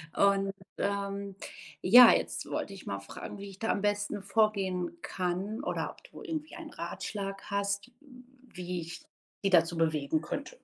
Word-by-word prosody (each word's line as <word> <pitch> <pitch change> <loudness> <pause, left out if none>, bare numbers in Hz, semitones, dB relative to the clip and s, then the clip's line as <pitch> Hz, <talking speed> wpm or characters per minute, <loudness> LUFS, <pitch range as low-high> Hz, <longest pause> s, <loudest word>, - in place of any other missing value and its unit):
Und, 195 0 +4 0.3
ähm, 200 0 -2 0.5
ja, 240 +5 +10
jetzt - - 0
wollte 195 - -3
ich 195 - -11
mal 100 - -2
fragen, 100 - -8
wie 200 - -7
ich 195 0 -13
da 225 - -1
am 200 - +1
besten 205 0 0
vorgehen 195 -4 +1
kann 190 +6 -2
oder - - -2
ob - - -19
du - - -10
irgendwie 315 -5 -4
einen - - -8
Ratschlag 195 -1 -5
hast, 200 +3 -1 0.6
wie 180 -1 -4
ich 165 +1 -8 0.4
die - - +5
dazu 170 -1 +4
bewegen 155 -2 +1
könnte. 280 - -5
200 Hz, 160 wpm, -31 LUFS, 180-205 Hz, 0.6 s, ja